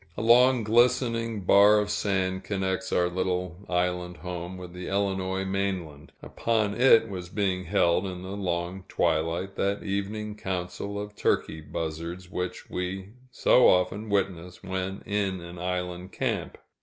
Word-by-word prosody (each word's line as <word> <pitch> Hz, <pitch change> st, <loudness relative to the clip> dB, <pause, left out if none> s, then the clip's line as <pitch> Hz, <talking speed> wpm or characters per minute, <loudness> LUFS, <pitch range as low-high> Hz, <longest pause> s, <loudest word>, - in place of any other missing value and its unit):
A -, -, -2 dB
long 125 Hz, +1 st, +6 dB
glistening 115 Hz, -1 st, +2 dB
bar 100 Hz, +3 st, +6 dB
of 105 Hz, 0 st, 0 dB
sand 95 Hz, -2 st, 0 dB
connects 95 Hz, -1 st, -2 dB
our 90 Hz, -, +3 dB
little 90 Hz, -1 st, -2 dB
island 90 Hz, 0 st, -1 dB
home 90 Hz, 0 st, -6 dB
with 90 Hz, -1 st, -9 dB
the 90 Hz, 0 st, -7 dB
Illinois 95 Hz, -1 st, -1 dB
mainland; 95 Hz, -6 st, -3 dB
upon 110 Hz, -3 st, 0 dB
it 115 Hz, -1 st, +6 dB
was 90 Hz, -4 st, -6 dB
being 95 Hz, -2 st, -1 dB
held, 90 Hz, 0 st, +2 dB
in 90 Hz, -1 st, -6 dB
the 95 Hz, +1 st, -5 dB
long 90 Hz, -1 st, -3 dB
twilight, 85 Hz, +5 st, 0 dB
that 100 Hz, +1 st, 0 dB
evening 105 Hz, +2 st, -3 dB
council 95 Hz, +1 st, -4 dB
of 105 Hz, 0 st, -7 dB
turkey 80 Hz, -5 st, 0 dB
buzzards, 85 Hz, +4 st, -5 dB
which 90 Hz, -2 st, -4 dB
we 95 Hz, +2 st, -4 dB, 0.2 s
so 125 Hz, -, +5 dB
often 95 Hz, +4 st, +1 dB
witness 90 Hz, -3 st, -2 dB
when 95 Hz, +1 st, -4 dB
in 100 Hz, -2 st, -1 dB
an 85 Hz, 0 st, -9 dB
island 90 Hz, 0 st, -3 dB
camp. -, -, -2 dB
95 Hz, 145 wpm, -27 LUFS, 90-100 Hz, 0.2 s, long